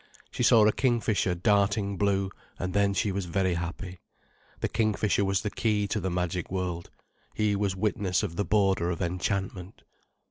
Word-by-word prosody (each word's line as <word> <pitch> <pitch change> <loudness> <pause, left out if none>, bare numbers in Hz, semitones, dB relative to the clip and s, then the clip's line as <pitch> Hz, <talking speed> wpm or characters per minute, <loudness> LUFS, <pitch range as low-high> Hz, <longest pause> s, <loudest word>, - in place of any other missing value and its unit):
She - - -4
saw 115 -3 +6
a 110 - +5
kingfisher 115 -7 +1
darting 100 +1 +1
blue—and 95 -2 -2
then 100 0 +2
she 100 +1 +1
was 95 -1 -2
very 95 +1 0
happy. 90 +2 -5 0.6
The - - +1
kingfisher 105 -2 +1
was 95 -1 0
the 105 - -2
key 105 -2 0
to 110 - 0
the 95 -1 -2
magic 90 -1 -2
world: 90 -2 -3 0.5
he 105 -1 +1
was 100 -1 0
witness 95 -2 0
of 85 - -3
the 100 - 0
border 95 -5 +2
of 85 - -3
enchantment. 95 +1 -3
100 Hz, 165 wpm, -28 LUFS, 90-105 Hz, 0.6 s, saw